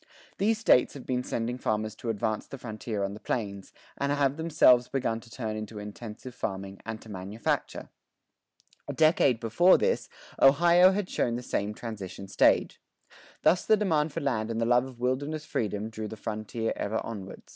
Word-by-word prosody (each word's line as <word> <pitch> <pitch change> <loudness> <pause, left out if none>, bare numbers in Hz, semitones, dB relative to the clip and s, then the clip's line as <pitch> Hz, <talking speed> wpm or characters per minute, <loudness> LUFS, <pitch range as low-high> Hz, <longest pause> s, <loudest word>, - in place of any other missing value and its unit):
These 215 +3 +2
States 180 - +4
have 135 - -9
been 125 -1 -1
sending 120 +2 -3
farmers 110 -2 -1
to 120 - -5
advance 110 0 -2
the 135 - -8
frontier 110 -3 -4
on 100 0 -2
the 105 - -9
plains, 100 -5 -4 0.2
and 140 0 -1
have 140 -1 +2
themselves 145 -6 +4
begun 120 -4 -1
to 115 - -16
turn 110 -3 -4
to 105 - -11
intensive 105 +4 -8
farming 95 -3 -5
and 110 -1 -4
to - - -15
manufacture. 100 +3 -3 1.0
A - - -3
decade 155 -6 +4
before 145 +12 +5
this, 475 0 0 0.3
Ohio 170 +6 +6
had 195 -1 -1
shown 120 -8 0
the 125 - -5
same 105 -2 -2
transition 100 -4 -7
stage. - - +2 0.6
Thus 175 - +4
the 215 - +4
demand 160 -7 +1
for - - -4
land 110 -5 -1
and 115 0 -2
the 115 - +1
love 125 +1 +3
of 130 -3 -11
wilderness 145 +5 -2
freedom 105 0 -2
drew 110 -1 -5
the 110 - -8
frontier 110 +2 -3
ever 110 +2 -2
onward. 100 -4 -7
115 Hz, 180 wpm, -28 LUFS, 110-140 Hz, 1.0 s, Ohio